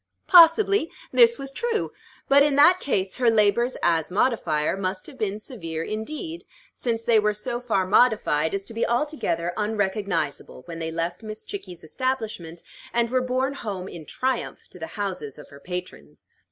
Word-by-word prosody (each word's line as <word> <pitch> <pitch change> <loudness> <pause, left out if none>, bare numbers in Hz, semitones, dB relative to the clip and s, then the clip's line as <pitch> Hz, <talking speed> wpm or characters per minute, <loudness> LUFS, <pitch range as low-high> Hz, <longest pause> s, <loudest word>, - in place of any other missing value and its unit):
Possibly 350 +1 +6 0.2
this 470 -1 +5
was 275 0 -5
true; 465 +8 -2 0.4
but 280 +1 +6
in 285 -1 +3
that 345 +6 +6
case 190 - -1
her 245 -2 +3
labors 225 +3 +2
as 165 -2 +2
modifier 180 -8 +1
must 185 -1 -3
have - - -10
been 210 -4 -2
severe 165 - -6
indeed, 305 - -5 0.3
since 230 -2 -2
they 230 -1 +4
were 210 0 +1
so 240 +3 -3
far 215 -6 0
modified 195 -7 +3
as 195 0 -4
to - - -9
be 230 - -1
altogether 235 - -1
unrecognizable 200 -10 -2
when 165 -1 -7
they 160 0 -3
left 170 +2 -3
Miss 215 -1 -8
Chickie's 185 - -8
establishment, 215 -5 -4 0.3
and 235 0 0
were 255 0 +2
borne 255 +2 -1
home 195 -8 -5
in 165 -5 -10
triumph 260 -1 -3
to 180 - -13
the 160 - -5
houses 185 -9 -4
of 150 - -13
her 140 - -13
patrons. 180 +4 -8
215 Hz, 165 wpm, -24 LUFS, 180-260 Hz, 0.4 s, Possibly